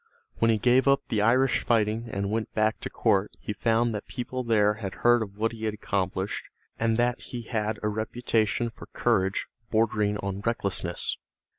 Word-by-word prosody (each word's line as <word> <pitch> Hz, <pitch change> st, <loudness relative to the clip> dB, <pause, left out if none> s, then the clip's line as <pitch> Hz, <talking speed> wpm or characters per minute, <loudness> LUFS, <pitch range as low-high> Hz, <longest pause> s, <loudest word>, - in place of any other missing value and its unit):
When 115 Hz, -, +4 dB
he 110 Hz, -, +4 dB
gave 125 Hz, +5 st, +3 dB
up 140 Hz, 0 st, +5 dB
the 110 Hz, -, +1 dB
Irish 125 Hz, +5 st, +3 dB
fighting 115 Hz, 0 st, +1 dB
and 100 Hz, +1 st, -2 dB
went 110 Hz, 0 st, -2 dB
back 110 Hz, 0 st, +2 dB
to -, -, -5 dB
court 100 Hz, +1 st, +2 dB
he 105 Hz, -, -4 dB
found 115 Hz, +2 st, +1 dB
that 105 Hz, -, -5 dB
people 130 Hz, 0 st, -4 dB
there 105 Hz, -3 st, +3 dB
had 95 Hz, -3 st, -4 dB
heard 120 Hz, 0 st, +6 dB
of 100 Hz, -2 st, -6 dB
what 115 Hz, +1 st, +1 dB
he 110 Hz, -1 st, -6 dB
had 110 Hz, -1 st, -1 dB
accomplished 95 Hz, -1 st, -2 dB, 0.4 s
and 115 Hz, 0 st, +2 dB
that 120 Hz, +1 st, +1 dB
he 120 Hz, -2 st, -6 dB
had 110 Hz, -2 st, -2 dB
a -, -, +1 dB
reputation 110 Hz, +1 st, 0 dB
for -, -, -12 dB
courage 95 Hz, +1 st, +1 dB, 0.2 s
bordering 110 Hz, -2 st, +1 dB
on 100 Hz, -1 st, -4 dB
recklessness. 100 Hz, -3 st, -1 dB
110 Hz, 180 wpm, -27 LUFS, 105-115 Hz, 0.4 s, heard